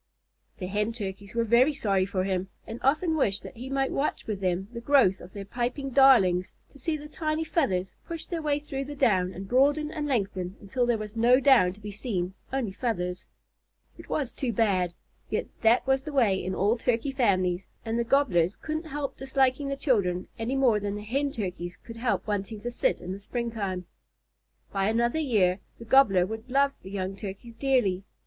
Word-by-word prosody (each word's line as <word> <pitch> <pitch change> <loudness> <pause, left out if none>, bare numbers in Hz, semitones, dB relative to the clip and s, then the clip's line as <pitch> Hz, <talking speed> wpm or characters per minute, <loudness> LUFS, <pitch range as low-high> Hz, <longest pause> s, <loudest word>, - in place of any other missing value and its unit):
The 185 - -5
Hen 210 +4 -1
Turkeys 200 -2 -6
were 230 - +2
very 240 +6 +4
sorry 195 -7 +1
for 185 -1 -1
him, 190 0 -1 0.2
and 225 +2 -7
often 315 +5 +2
wished 205 -10 +1
that - - -9
he 250 +3 -7
might 270 0 0
watch 285 - -1
with 210 -3 -3
them 185 +1 0
the 235 - -6
growth 240 -8 +4
of 180 - -11
their 200 -1 -6
piping 250 +5 -3
darlings, 215 -10 +5 0.2
to 280 - -15
see 310 +4 -1
the 300 0 -9
tiny 310 0 -2
feathers 195 - 0
push 330 -1 -5
their 335 -2 -4
way 295 -2 +1
through 275 -2 -5
the 290 +1 -7
down 185 -8 +2
and 190 +1 -7
broaden 290 +6 +3
and 300 -2 -3
lengthen 195 -7 -1
until 240 +5 -1
there 240 -2 +2
was 215 0 -7
no 240 +3 +5
down 260 -10 +5
to 200 - -16
be 210 0 -7
seen 190 -4 -3 0.2
only 260 -6 -1
feathers. 185 -5 -3 0.7
It - - -13
was 275 -5 -1
too 255 -4 -2
bad; 190 -6 +1 0.3
yet - - -1 0.2
that 230 +2 +4
was 265 0 +2
the 300 +2 -7
way 220 -9 +3
in 185 +1 -2
all 215 +5 +2
Turkey 245 +3 0
families, 185 -8 +1 0.2
and 225 +1 -1
the - - +2
Gobblers 215 -9 +2
couldn't 315 +1 -4
help 290 -2 -4
disliking 270 +1 +1
the 275 - -1
children 195 - +1
any 235 +4 -1
more 250 -6 +4
than 205 0 -3
the 210 - -6
Hen 275 +6 -1
Turkeys 180 -5 -5
could 230 +2 -11
help 235 +1 0
wanting 205 0 -3
to 240 - -4
sit 240 - 0
in 180 - -6
the 195 - -5
springtime. 200 -5 -3 0.9
By 195 +1 +1
another 235 +6 +1
year 205 - +2 0.2
the 230 - -10
Gobbler 220 -8 +5
would 220 +5 -7
love 275 +2 +3
the 190 - -10
young 190 -1 -3
Turkeys 200 +4 -8
dearly. 230 -8 +1
230 Hz, 200 wpm, -27 LUFS, 195-270 Hz, 0.9 s, darlings